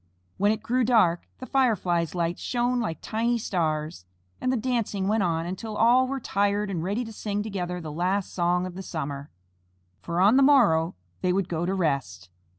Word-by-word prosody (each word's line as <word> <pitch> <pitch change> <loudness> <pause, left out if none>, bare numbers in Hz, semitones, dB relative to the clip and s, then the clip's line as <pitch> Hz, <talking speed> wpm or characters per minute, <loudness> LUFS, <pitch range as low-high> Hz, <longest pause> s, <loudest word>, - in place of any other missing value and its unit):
When 205 +2 +3
it 220 0 -3
grew 250 +3 +1
dark, 215 -8 +3
the 255 - -8
Fireflies' 185 - +1
lights 170 0 -1
shone 245 0 0
like 215 -9 -2
tiny 230 +2 0
stars, 155 - -2 0.4
and 255 - +1
the 260 - +1
dancing 225 -5 -1
went 215 +1 +2
on 165 -3 0
until 210 +4 -5
all 245 +3 +5
were 270 +1 -3
tired 205 -2 0
and 175 -4 -2
ready 205 +7 -1
to 225 - -9
sing 205 -1 -3
together 180 -4 -4
the 160 -3 -7
last 185 +5 -1
song 180 0 +1
of 185 - -6
the 190 - -7
summer, 145 -5 -5 0.7
for 170 - -3
on 205 +7 +5
the - - +5
morrow 215 - +4 0.3
they 180 - +1
would 190 0 0
go 170 +1 -2
to 190 - 0
rest. 135 - -2
195 Hz, 190 wpm, -26 LUFS, 170-225 Hz, 0.7 s, all